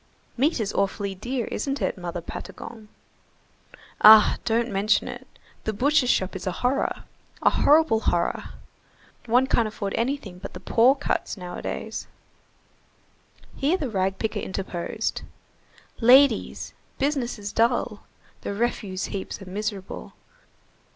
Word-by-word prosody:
"Meat 275 Hz, +4 st, +1 dB
is 210 Hz, -2 st, -2 dB
awfully 200 Hz, 0 st, -1 dB
dear, 240 Hz, +5 st, -3 dB
isn't 275 Hz, 0 st, -2 dB
it, -, -, -1 dB
Mother 175 Hz, -1 st, -5 dB
Patagon?" 220 Hz, +5 st, -9 dB, 1.1 s
"Ah! 215 Hz, 0 st, +9 dB
don't 230 Hz, +1 st, +1 dB
mention 205 Hz, +2 st, +2 dB
it, -, -, -8 dB, 0.4 s
the 220 Hz, -, -2 dB
butcher's 270 Hz, +3 st, +2 dB
shop 190 Hz, -3 st, +1 dB
is 190 Hz, -, -5 dB
a -, -, +1 dB
horror. 255 Hz, +2 st, 0 dB, 0.4 s
A -, -, +5 dB
horrible 295 Hz, -7 st, +4 dB
horror—one 230 Hz, +6 st, -2 dB
can't 235 Hz, -4 st, +2 dB
afford 200 Hz, -2 st, -4 dB
anything 230 Hz, -7 st, -2 dB
but 195 Hz, -, -8 dB
the -, -, -8 dB
poor 245 Hz, +4 st, +4 dB
cuts 285 Hz, -5 st, -2 dB
nowadays." 180 Hz, -1 st, -5 dB, 1.5 s
Here 305 Hz, +7 st, +1 dB
the 285 Hz, -9 st, -3 dB
rag 190 Hz, -1 st, 0 dB
picker 220 Hz, -1 st, -2 dB
interposed:— 190 Hz, +2 st, -3 dB, 0.8 s
"Ladies, 250 Hz, 0 st, +4 dB, 0.2 s
business 270 Hz, -4 st, -1 dB
is 205 Hz, -1 st, -6 dB
dull. 230 Hz, -2 st, +1 dB, 0.4 s
The 200 Hz, -, -4 dB
refuse 205 Hz, -4 st, -2 dB
heaps 195 Hz, -2 st, -5 dB
are 195 Hz, -, -10 dB
miserable. 205 Hz, -1 st, -5 dB
220 Hz, 125 wpm, -25 LUFS, 195-250 Hz, 1.5 s, Ah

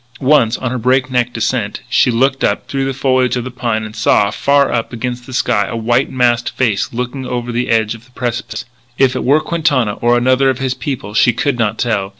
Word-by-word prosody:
Once, 130 Hz, -4 st, +3 dB
on 130 Hz, -2 st, -3 dB
her 130 Hz, -, -2 dB
breakneck 125 Hz, 0 st, +1 dB
descent, 110 Hz, -2 st, -2 dB
she 120 Hz, -, +3 dB
looked 135 Hz, +3 st, +1 dB
up -, -, 0 dB
through 135 Hz, -1 st, -2 dB
the 135 Hz, -, -1 dB
foliage 130 Hz, -2 st, +1 dB
of 125 Hz, -, -2 dB
the 130 Hz, -, -6 dB
pine; 115 Hz, -3 st, -2 dB
and 110 Hz, 0 st, -8 dB
she -, -, -6 dB
saw, 100 Hz, 0 st, +3 dB
far 140 Hz, +3 st, +2 dB
up 115 Hz, -2 st, -2 dB
against 120 Hz, +1 st, -5 dB
the -, -, -9 dB
sky, 105 Hz, -5 st, +1 dB
a -, -, -4 dB
white 120 Hz, +4 st, +1 dB
masked 120 Hz, -2 st, +1 dB
face 110 Hz, -6 st, 0 dB
looking 125 Hz, +3 st, -4 dB
over 120 Hz, -1 st, -3 dB
the 120 Hz, +1 st, -2 dB
edge 110 Hz, -1 st, +2 dB
of 115 Hz, 0 st, -13 dB
the 130 Hz, -, -24 dB
precipice. 120 Hz, -2 st, -4 dB, 0.3 s
But 135 Hz, -, +5 dB
if 130 Hz, -, -1 dB
it -, -, -2 dB
were 140 Hz, +4 st, +4 dB
Quintana 145 Hz, -11 st, 0 dB
or 120 Hz, +1 st, +3 dB
another 130 Hz, +2 st, +3 dB
of 130 Hz, -, 0 dB
his 130 Hz, -1 st, -1 dB
people 130 Hz, -6 st, -5 dB
she 120 Hz, +2 st, +4 dB
could 130 Hz, +1 st, -1 dB
not 110 Hz, -1 st, 0 dB
tell. 105 Hz, -5 st, -1 dB
125 Hz, 230 wpm, -16 LUFS, 115-130 Hz, 0.3 s, But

